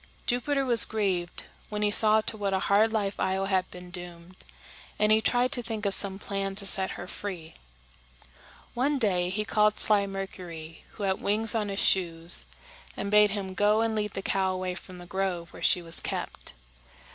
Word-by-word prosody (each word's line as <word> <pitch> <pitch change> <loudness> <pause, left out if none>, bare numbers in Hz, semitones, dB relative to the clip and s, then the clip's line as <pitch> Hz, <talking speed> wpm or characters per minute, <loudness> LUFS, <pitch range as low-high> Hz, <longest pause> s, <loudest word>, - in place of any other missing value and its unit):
Jupiter 270 +3 -1
was 235 -3 +6
grieved 190 -5 -2 0.2
when 210 0 -3
he 210 - +1
saw 215 +1 +7
to 215 - -1
what 200 -2 -2
a - - 0
hard 215 +3 +4
life 205 -3 -2
Io 190 +1 -1
had 190 -2 0
been 180 0 -12
doomed, 175 0 -9 0.6
and 210 0 +2
he 220 0 +5
tried 245 +4 +1
to 255 -4 -1
think 220 -3 -5
of 200 - +2
some 195 -1 +6
plan 195 -1 -4
to 200 0 +3
set 190 -1 +2
her 175 - -7
free. 180 -4 -7 1.2
One 280 +4 0
day 185 -7 +1
he 210 +3 -3
called 210 -1 +1
sly 205 -2 +3
Mercury, 180 -5 -8
who 210 - -8
had 190 -1 -1
wings 215 +2 +2
on 215 -3 -1
his 195 0 -1
shoes, 170 - 0 0.5
and 200 +1 -4
bade 210 0 +5
him 200 -2 -5
go 210 +3 +2
and 225 -1 -1
lead 210 -1 -3
the 195 - -5
cow 190 -1 0
away 185 0 -3
from 185 0 -10
the 175 - -11
grove 180 -2 -4
where - - -12
she 180 - +2
was 165 -1 -3
kept. - - -6
195 Hz, 190 wpm, -27 LUFS, 185-215 Hz, 1.2 s, saw